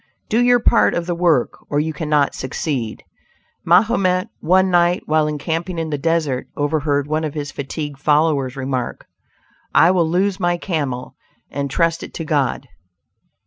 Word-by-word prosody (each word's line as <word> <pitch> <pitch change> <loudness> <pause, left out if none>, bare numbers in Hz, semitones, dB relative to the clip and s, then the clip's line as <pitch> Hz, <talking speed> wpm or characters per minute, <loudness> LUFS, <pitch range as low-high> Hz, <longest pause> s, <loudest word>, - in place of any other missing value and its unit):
Do 225 - +2
your 245 0 +5
part - - +3
of 170 - -2
the 175 - -1
work, 170 -7 +1
or 145 - +1
you 160 +1 -1
cannot 150 -2 +1
succeed. 130 -3 -4 0.6
Mahomet, 185 +1 +3
one 185 +2 +3
night, 175 0 +3
while 155 0 +2
encamping 165 +4 -3
in 160 -1 -3
the 145 - -1
desert, 155 -4 0
overheard 145 -1 0
one 155 +2 -1
of 155 -1 -4
his 145 -2 -4
fatigued 145 0 -5
followers 145 -3 +2
remark: 130 -2 -3 0.7
"I 165 +3 +6
will 175 -3 +2
loose 190 +3 +1
my 175 -1 +1
camel, 145 -9 -3 0.4
and 140 0 -3
trust 165 +3 +1
it - - -9
to 165 - -4
God!" 140 -3 0
155 Hz, 155 wpm, -20 LUFS, 145-175 Hz, 0.7 s, I